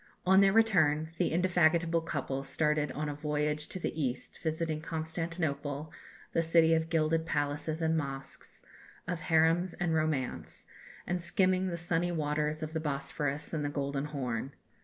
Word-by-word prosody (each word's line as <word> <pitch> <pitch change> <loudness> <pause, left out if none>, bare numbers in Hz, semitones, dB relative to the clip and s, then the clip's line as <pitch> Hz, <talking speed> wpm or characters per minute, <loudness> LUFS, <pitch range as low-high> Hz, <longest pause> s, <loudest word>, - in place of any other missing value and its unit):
On 190 +1 +6
their 195 0 +6
return, 160 -9 +3
the - - +2
indefatigable 170 -1 +3
couple 135 -4 -3
started 150 0 0
on 150 +1 -3
a 145 - -2
voyage 150 0 -1
to - - -4
the 160 -3 -3
East, 130 -2 -3
visiting 160 -1 -1
Constantinople, 160 -2 -3 0.4
the 165 - +3
city 165 0 +4
of 160 0 +1
gilded 160 0 +2
palaces 150 +1 -1
and 160 0 +2
mosques, 135 -3 -5 0.4
of 175 -1 -2
harems 165 +3 +2
and 175 -2 0
romance; 155 -5 -2 0.4
and 175 0 -1
skimming 185 +2 +2
the 170 -2 -2
sunny 175 +1 0
waters 150 -1 -1
of 155 0 -5
the 160 - 0
Bosphorus 145 0 -3
and 155 -2 -1
the 145 - -1
Golden 140 0 -2
Horn. 135 -3 -3
155 Hz, 155 wpm, -31 LUFS, 150-165 Hz, 0.4 s, On